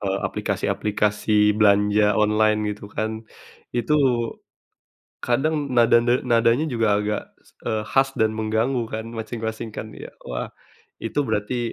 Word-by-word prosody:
eee, 95 Hz, -1 st, -1 dB
aplikasi-aplikasi 105 Hz, 0 st, +1 dB
belanja 105 Hz, 0 st, +4 dB
online 105 Hz, 0 st, +3 dB
gitu 105 Hz, 0 st, -7 dB
kan. 110 Hz, +1 st, -4 dB, 0.5 s
Itu 120 Hz, +4 st, +1 dB, 1.3 s
kadang 145 Hz, +4 st, 0 dB
nada 120 Hz, 0 st, +6 dB
ne 120 Hz, +2 st, +2 dB
nadanya 120 Hz, +3 st, +3 dB
juga 115 Hz, -4 st, 0 dB
agak, 105 Hz, 0 st, -2 dB, 0.4 s
eee, 110 Hz, -1 st, -1 dB
khas 135 Hz, 0 st, +3 dB
dan 110 Hz, 0 st, +3 dB
mengganggu 110 Hz, +4 st, 0 dB
kan 110 Hz, 0 st, -3 dB
masing-masing 110 Hz, 0 st, -5 dB
kan, 110 Hz, -, -5 dB
ya? -, -, -9 dB, 0.2 s
Wah 60 Hz, -, -4 dB, 0.6 s
itu 115 Hz, -, -3 dB
berarti, 115 Hz, +3 st, -1 dB
110 Hz, 125 wpm, -23 LUFS, 105-120 Hz, 1.3 s, nada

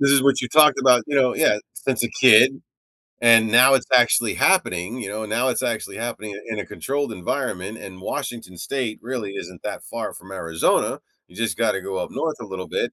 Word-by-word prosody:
this 140 Hz, 0 st, +3 dB
is 135 Hz, -, +4 dB
what 140 Hz, -1 st, +3 dB
you 125 Hz, -, -4 dB
talked 150 Hz, +1 st, +5 dB
about, 125 Hz, -3 st, +5 dB
you 145 Hz, -, -2 dB
know" 130 Hz, -2 st, +3 dB
yeah, 105 Hz, -, +2 dB, 0.2 s
"...since 125 Hz, -1 st, -2 dB
a 120 Hz, -, -1 dB
kid, 130 Hz, +2 st, +6 dB, 0.6 s
and 115 Hz, -1 st, +6 dB
now 125 Hz, +4 st, +6 dB
it's 130 Hz, -, +2 dB
actually 120 Hz, -2 st, +3 dB
happening, 115 Hz, -, +1 dB
you -, -, -6 dB
know? 110 Hz, +1 st, -5 dB
Now 120 Hz, +5 st, 0 dB
it's 125 Hz, -, -1 dB
actually 110 Hz, -4 st, -3 dB
happening 110 Hz, -3 st, -6 dB
in 110 Hz, -2 st, -4 dB
a -, -, -7 dB
controlled 140 Hz, -3 st, -4 dB
environment. 100 Hz, 0 st, -4 dB
And 95 Hz, -1 st, -11 dB
Washington 95 Hz, -1 st, -6 dB
State 125 Hz, -6 st, -4 dB
really 120 Hz, -5 st, -5 dB
isn't 90 Hz, -2 st, -9 dB
that -, -, -5 dB
far -, -, -6 dB
from 95 Hz, +2 st, -13 dB
Arizona, 85 Hz, -3 st, -1 dB, 0.3 s
you 90 Hz, -, -19 dB
just 115 Hz, 0 st, -2 dB
gotta 105 Hz, -4 st, 0 dB
go 95 Hz, 0 st, -5 dB
up 90 Hz, -, -4 dB
north 160 Hz, -1 st, -3 dB
a 110 Hz, -, -7 dB
little 95 Hz, -1 st, -7 dB
bit, -, -, -2 dB
115 Hz, 210 wpm, -22 LUFS, 100-130 Hz, 0.6 s, kid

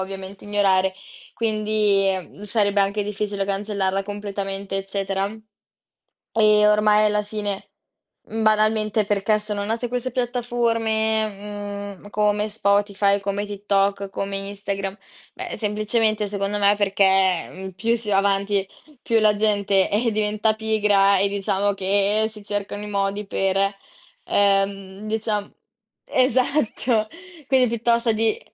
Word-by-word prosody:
ovviamente 190 Hz, +1 st, -7 dB
ignorare, 190 Hz, -2 st, +2 dB, 0.4 s
quindi 210 Hz, -4 st, 0 dB
sarebbe 205 Hz, -1 st, +1 dB
anche 200 Hz, +2 st, +1 dB
difficile 205 Hz, -1 st, -2 dB
cancellarla 195 Hz, -1 st, -1 dB
completamente, 200 Hz, -1 st, -4 dB
eccetera. 195 Hz, 0 st, -2 dB, 1.0 s
E 210 Hz, -1 st, +5 dB
ormai 210 Hz, 0 st, +4 dB
alla 210 Hz, 0 st, +1 dB
fine, 205 Hz, -1 st, -5 dB, 0.6 s
mhmm, 225 Hz, 0 st, -3 dB
banalmente, 215 Hz, 0 st, +2 dB
perché 205 Hz, +1 st, +1 dB
sono 210 Hz, -1 st, -4 dB
nate 230 Hz, +3 st, -2 dB
queste 250 Hz, +1 st, -2 dB
piattaforme, 220 Hz, -4 st, -1 dB
mhmm, 205 Hz, -, -12 dB
come 210 Hz, 0 st, +1 dB
Spotify, 200 Hz, -1 st, +2 dB
come 200 Hz, +1 st, -2 dB
TikTok, 200 Hz, -1 st, 0 dB
come 195 Hz, 0 st, -3 dB
Instagram, 195 Hz, 0 st, -4 dB, 0.4 s
beh, -, -, -6 dB
semplicemente 215 Hz, 0 st, 0 dB
secondo 200 Hz, 0 st, -2 dB
me 205 Hz, 0 st, +4 dB
perché, 195 Hz, -3 st, +3 dB
mhmm, 190 Hz, +1 st, -7 dB
più 230 Hz, +6 st, 0 dB
si 220 Hz, -2 st, -7 dB
va 195 Hz, -, +3 dB
avanti, 195 Hz, 0 st, +1 dB, 0.3 s
più 230 Hz, -1 st, +2 dB
la 215 Hz, -1 st, +4 dB
gente, 205 Hz, -2 st, +2 dB
eh, 225 Hz, +3 st, +1 dB
diventa 215 Hz, +1 st, +1 dB
pigra 210 Hz, -3 st, +3 dB
e 200 Hz, -, +3 dB
diciamo 200 Hz, 0 st, 0 dB
che 200 Hz, +2 st, +1 dB
si 210 Hz, -1 st, -12 dB
cercano 205 Hz, 0 st, -4 dB
i -, -, -6 dB
modi 200 Hz, 0 st, -1 dB
per, 195 Hz, -1 st, 0 dB, 0.7 s
ehm, 195 Hz, 0 st, 0 dB
dicia 215 Hz, -2 st, -2 dB, 0.5 s
esatto. 255 Hz, -3 st, +1 dB, 0.4 s
Quindi 260 Hz, -2 st, +4 dB
piuttosto 235 Hz, 0 st, +1 dB
di 225 Hz, -, 0 dB
205 Hz, 120 wpm, -23 LUFS, 195-215 Hz, 1.0 s, E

